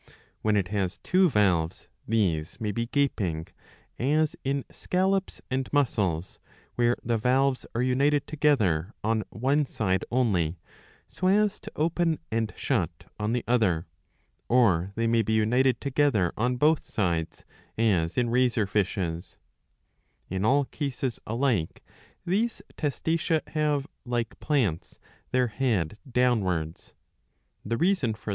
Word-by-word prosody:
^ - - -22 0.3
When 105 -1 +2
it 95 -3 0
has 95 -3 -1
two 185 0 +4
valves, 90 - +1 0.2
these 90 -8 0
may 105 -2 -1
be 115 +3 -2
gaping, 100 - 0 0.5
as 150 +4 +2
in 135 0 -1
scallops 190 +1 -1
and 130 0 -1
mussels, 100 - 0 0.3
where 120 0 +2
the 115 -1 0
valves 130 +3 +1
are 120 - +1
united 140 +3 +2
together 115 - +1
on 110 +1 +1
one 135 +5 +1
side 95 -6 0
only, 95 -10 +1 0.5
so 185 - -2
as 210 +2 +3
to 215 - -10
open 165 +1 +1
and 110 -1 0
shut 90 - -1
on 105 +2 0
the 120 - -1
other, 100 -9 +2 0.6
or 100 -7 +3
they 115 - 0
may 115 0 +3
be 110 +1 -1
united 120 +3 +3
together 135 - +1
on 125 +3 0
both 150 +4 +3
sides, 85 -6 -2 0.3
as 90 -7 +1
in 120 -2 +1
razor 120 -3 +2
fishes,* 90 -4 -2 0.9
In 95 +1 -1
all 140 +5 +3
cases 130 -4 -3
alike 115 - 0 0.4
these 215 +6 0 0.2
Testacea 160 +2 -1
have, 150 -3 0 0.2
like 120 -3 -3
plants, 120 - -1 0.3
their 125 -1 +2
head 105 - -1
downwards. 95 -10 0 0.7
The 115 +3 -2
reason 170 - +1
for. 110 - -8
120 Hz, 130 wpm, -27 LUFS, 100-140 Hz, 0.9 s, two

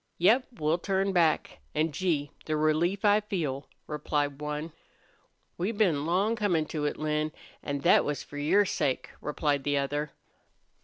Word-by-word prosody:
"Yep, 230 +9 +4
we'll 160 -2 0
turn 195 +1 0
back. 165 - +2 0.2
An', 155 +1 +1
Gee! 150 -3 -1 0.2
the 155 -1 0
relief 165 +6 +1
I 205 0 +6
feel!" 155 -10 -3 0.2
replied 145 -1 -2
one. 150 +2 -4 0.9
"We've 205 +5 -1
been 160 -9 +2
long 195 +6 +2
comin' 180 -8 +1
to 150 -2 -2
it, 145 - -1
Lin, 155 0 -1 0.3
an' 140 -1 -3
thet - - +5
was 145 -2 -2
for 145 - -8
your 185 +8 +4
sake," 145 -7 -1
replied 145 -1 0
the 145 0 +1
other. 145 +2 -1
155 Hz, 155 wpm, -29 LUFS, 145-185 Hz, 0.9 s, I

